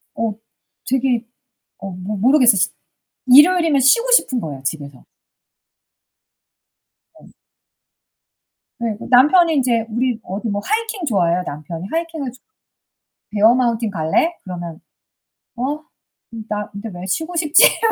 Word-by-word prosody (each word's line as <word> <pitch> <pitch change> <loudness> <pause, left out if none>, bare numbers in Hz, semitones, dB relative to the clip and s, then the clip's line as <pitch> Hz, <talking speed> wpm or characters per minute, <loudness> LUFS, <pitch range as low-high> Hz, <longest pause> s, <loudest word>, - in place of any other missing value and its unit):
어 225 -1 -2 0.6
되게 250 -2 0 0.5
어 195 - -7
모 185 +3 -6
모르겠어요, 250 +1 +4
쉬 180 - +1 0.6
일요일이면 305 +2 +5
쉬고 465 - +3
싶은 260 - +3
거야, 145 -6 -7
집에서. 140 -2 -6 2.1
어. - - -19 1.5
네 235 -1 -2
나 - - -9
남편이 335 +3 +3
인제 240 -5 +1
우리 240 +1 -1
어디 205 +5 -5
뭐 205 0 -2
하이킹 440 -4 -2
좋아해요 180 - +1
남편이. 160 +4 -7
하이킹을 325 -5 -3
좋 255 - -20 0.9
"베어마운틴 230 +1 +2
갈래?" 170 - 0
그러면 175 -3 -7 0.8
"어? 275 +5 -3 0.7
나 210 -1 -4
근데 205 +2 -8
왜 175 +1 -8
쉬고 320 - -3
싶지?" 310 -1 +5
이러면 455 -1 +3
235 Hz, 250 characters per minute, -19 LUFS, 190-295 Hz, 2.1 s, 일요일이면